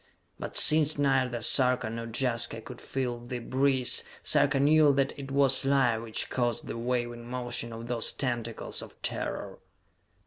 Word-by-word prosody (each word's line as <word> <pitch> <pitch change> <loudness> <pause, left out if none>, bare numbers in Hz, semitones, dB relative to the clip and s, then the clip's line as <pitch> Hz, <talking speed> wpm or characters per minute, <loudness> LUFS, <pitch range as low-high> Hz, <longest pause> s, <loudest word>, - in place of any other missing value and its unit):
But - - -3
since 155 0 +5
neither 130 -4 +1
Sarka 125 -1 +2
nor 115 +1 -5
Jaska 115 -1 -1
could 120 +2 -11
feel 125 -3 -3
the 120 +1 -6
breeze, 130 +1 +2 0.2
Sarka 140 -1 +3
knew 150 +1 +5
that 135 0 0
it 140 -1 -8
was 135 -1 +3
life 135 -5 +2
which 115 -1 -4
caused 120 -2 -1
the - - -6
waving 120 0 -3
motion 120 -2 -3
of 115 0 -8
those 120 -1 -1
tentacles 120 -4 -3
of - - -13
terror. 100 -2 -4
125 Hz, 150 wpm, -28 LUFS, 120-135 Hz, 0.2 s, since